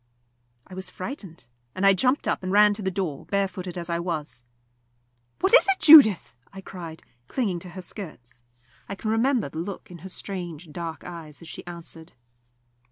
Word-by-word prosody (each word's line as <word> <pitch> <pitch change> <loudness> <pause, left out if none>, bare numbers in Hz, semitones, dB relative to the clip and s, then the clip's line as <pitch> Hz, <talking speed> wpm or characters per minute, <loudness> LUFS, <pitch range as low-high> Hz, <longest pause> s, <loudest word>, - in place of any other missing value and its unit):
I 190 - -14
was 185 0 -5
frightened, 185 - -8 0.3
and 190 - 0
I 195 - +7
jumped 255 +8 +1
up - - 0
and 185 0 -3
ran 210 +1 +6
to 210 - -6
the 190 - 0
door, 180 -7 -4
barefooted 190 -2 -2
as 170 -1 -4
I 170 -1 -1
was. 160 -8 -4 1.0
"What 380 +4 +2
is - - +8
it, 385 - +3
Judith?" 280 - +8 0.2
I 195 - -10
cried, 170 -4 -9 0.2
clinging 200 -9 -1
to 180 - -10
her 185 +1 -8
skirts. 125 - -9 0.5
I 200 - -4
can 215 +2 -3
remember 235 - +2
the 160 - -6
look 185 +1 -6
in 175 - -10
her 190 +4 -9
strange 175 -4 -6
dark 165 -1 -6
eyes 165 -3 -9
as - - -11
she - - -8
answered. 170 -1 -10
185 Hz, 180 wpm, -25 LUFS, 170-200 Hz, 1.0 s, is